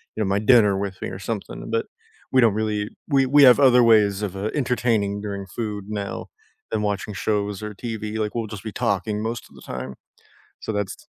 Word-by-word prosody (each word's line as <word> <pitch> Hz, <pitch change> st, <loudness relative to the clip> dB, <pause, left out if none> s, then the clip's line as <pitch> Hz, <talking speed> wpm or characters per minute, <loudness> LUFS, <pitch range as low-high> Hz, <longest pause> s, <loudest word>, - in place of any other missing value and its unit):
you -, -, -6 dB
know, -, -, -1 dB
my -, -, +2 dB
dinner 105 Hz, -5 st, +5 dB
with 95 Hz, -1 st, -6 dB
me -, -, -3 dB
or -, -, -8 dB
something, 110 Hz, -1 st, -5 dB
but 115 Hz, 0 st, 0 dB, 0.5 s
we 130 Hz, -, +5 dB
don't 115 Hz, -3 st, +5 dB
really 105 Hz, -1 st, -1 dB, 0.3 s
we 135 Hz, -, +6 dB
we 145 Hz, -, +9 dB
have 125 Hz, -1 st, +8 dB
other 125 Hz, -3 st, +6 dB
ways 105 Hz, -3 st, +5 dB
of, 95 Hz, -, -11 dB
uh, 100 Hz, +3 st, -2 dB
entertaining 115 Hz, -5 st, +1 dB
during 100 Hz, -1 st, -5 dB
food 105 Hz, -3 st, -3 dB, 0.2 s
now 100 Hz, -, -5 dB, 0.6 s
than -, -, 0 dB
watching 105 Hz, +1 st, -4 dB
shows 105 Hz, -2 st, -1 dB
or 105 Hz, -, -3 dB
TV, 115 Hz, -2 st, -4 dB, 0.2 s
like, 105 Hz, -1 st, -2 dB
we'll 115 Hz, -2 st, -2 dB
just 100 Hz, -, -10 dB
be 110 Hz, -, -5 dB, 0.2 s
talking 105 Hz, +1 st, 0 dB
most 120 Hz, 0 st, -5 dB
of -, -, -21 dB
the -, -, -14 dB
time. 65 Hz, +1 st, -5 dB, 0.7 s
So -, -, -8 dB
that's 105 Hz, -2 st, -2 dB
105 Hz, 210 wpm, -23 LUFS, 100-115 Hz, 0.7 s, we